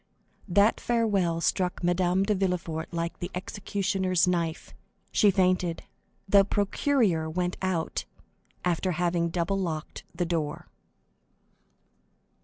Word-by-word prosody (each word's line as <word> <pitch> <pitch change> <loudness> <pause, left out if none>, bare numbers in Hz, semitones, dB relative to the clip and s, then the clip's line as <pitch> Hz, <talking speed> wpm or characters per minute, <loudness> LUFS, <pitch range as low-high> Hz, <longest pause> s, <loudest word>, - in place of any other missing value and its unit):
That 200 +4 +3
farewell 200 -8 +1
struck 180 +1 0
Madame 180 +1 +2
de 210 +2 +1
Villefort 180 -4 -2
like 170 0 -3
the 175 - -4
executioner's 190 -1 0
knife. 170 -2 -1 0.4
She 210 - +4
fainted. 185 -3 +1 0.4
The 195 0 +6
procureur 200 - +1
went 180 +2 -1
out, 185 -4 -1 0.6
after 180 +1 +1
having 170 0 0
double 180 +3 -1
locked 160 -4 -4
the 175 +1 0
door. 160 -3 -2
180 Hz, 105 wpm, -27 LUFS, 170-195 Hz, 0.6 s, The